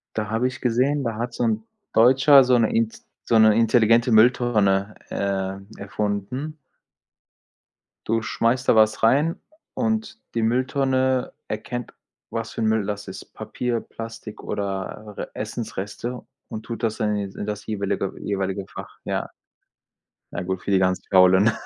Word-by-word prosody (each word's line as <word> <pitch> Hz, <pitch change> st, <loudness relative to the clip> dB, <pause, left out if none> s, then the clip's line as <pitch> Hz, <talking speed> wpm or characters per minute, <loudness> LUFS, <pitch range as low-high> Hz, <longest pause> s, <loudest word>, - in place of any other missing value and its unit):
Da 105 Hz, -1 st, -2 dB
habe 115 Hz, +3 st, +1 dB
ich 130 Hz, -, -7 dB
gesehen, 130 Hz, +4 st, +1 dB
da 115 Hz, -3 st, -2 dB
hat 120 Hz, +1 st, -3 dB
so -, -, -2 dB
'n 220 Hz, -1 st, 0 dB, 0.3 s
Deutscher 135 Hz, +4 st, +7 dB
so 125 Hz, -1 st, +4 dB
'ne 115 Hz, -2 st, +2 dB
int 115 Hz, 0 st, 0 dB, 0.2 s
so 115 Hz, -, +3 dB
'ne 110 Hz, -1 st, +6 dB
intelligente 115 Hz, +1 st, +4 dB
Mülltonne, 110 Hz, -4 st, +3 dB
äh, 95 Hz, -1 st, -2 dB, 0.2 s
erfunden. 105 Hz, +9 st, -3 dB, 1.5 s
Du 115 Hz, +1 st, +1 dB
schmeißt 120 Hz, +3 st, 0 dB
da -, -, +6 dB
was 110 Hz, 0 st, +3 dB
rein, 150 Hz, +10 st, +3 dB, 0.4 s
und 225 Hz, -1 st, -1 dB, 0.2 s
die 115 Hz, -, +1 dB
Mülltonne 130 Hz, +2 st, +1 dB, 0.2 s
erkennt, 120 Hz, +3 st, -5 dB, 0.4 s
was 115 Hz, -1 st, -3 dB
für -, -, -7 dB
'n 110 Hz, -, +2 dB
Müll 110 Hz, -2 st, +1 dB
das 105 Hz, 0 st, -4 dB
ist. -, -, -10 dB
Papier, 120 Hz, -2 st, -3 dB
Plastik 115 Hz, -1 st, -9 dB
oder 100 Hz, +1 st, -4 dB
Essensreste 115 Hz, +6 st, -5 dB, 0.3 s
und 110 Hz, -, -6 dB
tut 115 Hz, 0 st, -7 dB
das 110 Hz, -1 st, 0 dB
dann 105 Hz, -1 st, 0 dB
in 100 Hz, -1 st, -3 dB
d -, -, -12 dB
in -, -, -3 dB
das 105 Hz, 0 st, -5 dB
jeweilige 100 Hz, -2 st, -2 dB
jeweilige 95 Hz, -1 st, -2 dB
Fach, -, -, -10 dB
ja. -, -, -2 dB, 1.0 s
Na 90 Hz, -, -3 dB
gut, 95 Hz, 0 st, -3 dB
für -, -, -3 dB
die 95 Hz, -, +4 dB
ganz 95 Hz, 0 st, +1 dB
Faulen. 95 Hz, +3 st, +6 dB
110 Hz, 150 wpm, -23 LUFS, 100-125 Hz, 1.5 s, Deutscher